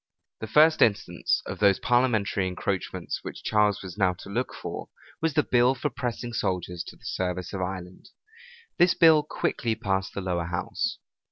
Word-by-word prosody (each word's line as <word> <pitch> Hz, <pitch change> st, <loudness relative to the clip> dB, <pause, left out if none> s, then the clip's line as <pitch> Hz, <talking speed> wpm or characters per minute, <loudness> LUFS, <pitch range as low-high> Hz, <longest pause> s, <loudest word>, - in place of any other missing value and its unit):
The 110 Hz, -, -5 dB
first 155 Hz, +7 st, +5 dB
instance 100 Hz, -6 st, +2 dB
of -, -, -6 dB
those 100 Hz, -2 st, +5 dB
parliamentary 115 Hz, -6 st, +1 dB
encroachments 95 Hz, +1 st, -3 dB
which -, -, -8 dB
Charles 105 Hz, -2 st, +2 dB
was 95 Hz, +1 st, -9 dB
now 95 Hz, -2 st, +3 dB
to 95 Hz, -, -11 dB
look 125 Hz, +5 st, -1 dB
for, -, -, -6 dB, 0.3 s
was 160 Hz, -1 st, 0 dB
the 150 Hz, -, +4 dB
bill 125 Hz, +2 st, +3 dB
for 145 Hz, +3 st, -2 dB
pressing 120 Hz, -1 st, -4 dB
soldiers 90 Hz, -4 st, -2 dB
to -, -, -10 dB
the -, -, -20 dB
service 90 Hz, 0 st, -3 dB
of 95 Hz, -, -3 dB
Ireland. 90 Hz, 0 st, -6 dB, 0.7 s
This 175 Hz, 0 st, +5 dB
bill 160 Hz, -2 st, +6 dB
quickly 120 Hz, -5 st, -2 dB
passed 95 Hz, -4 st, -2 dB
the 100 Hz, -, -2 dB
lower 90 Hz, -2 st, -1 dB
house. 90 Hz, -, -2 dB
105 Hz, 170 wpm, -26 LUFS, 95-125 Hz, 0.7 s, bill